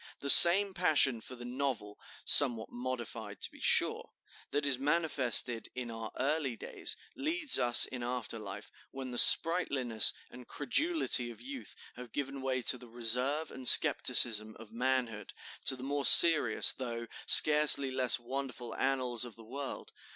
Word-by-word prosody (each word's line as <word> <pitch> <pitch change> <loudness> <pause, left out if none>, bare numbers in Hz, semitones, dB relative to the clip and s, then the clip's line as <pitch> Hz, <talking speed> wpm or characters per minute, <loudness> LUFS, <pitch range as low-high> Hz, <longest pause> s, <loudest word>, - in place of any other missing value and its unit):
The 140 - -1
same 190 +3 +8
passion 145 -9 -2
for 130 - -12
the 120 0 -14
novel 125 -5 -8 0.3
(somewhat 120 -6 +1
modified, 125 -1 -10
to - - -4
be - - -20
sure), - - -3 0.4
that 145 0 -5
is 135 -3 -3
manifested 135 -6 -2
in 125 -2 -9
our 115 -1 -11
early 140 -1 -5
days, - - -6 0.2
leads 310 0 -2
us, 120 0 +4
in 125 - -11
after 120 -2 -8
life, 100 0 -12 0.2
when 130 -1 -11
the 120 - -2
sprightliness 135 -10 +4 0.2
and 125 0 -16
credulity 290 - -2
of 120 - -15
youth 270 0 -13 0.2
have 125 -2 -14
given 140 -1 -8
way 130 -1 -6
to 125 - +2
the 125 - -16
reserve 125 +7 -3
and 130 -1 -5
skepticism 110 -2 +4
of 115 -2 -17
manhood, 120 -2 -6 0.3
to - - 0
the 130 - -14
more 140 +1 -6
serious, 155 -10 +5
though 115 -2 -9 0.2
scarcely 150 -3 +4
less 130 -1 -2
wonderful 125 -1 -10
annals 130 -3 -4
of 120 -4 -12
the 115 - -17
world. 135 +4 -11
130 Hz, 155 wpm, -28 LUFS, 120-145 Hz, 0.4 s, same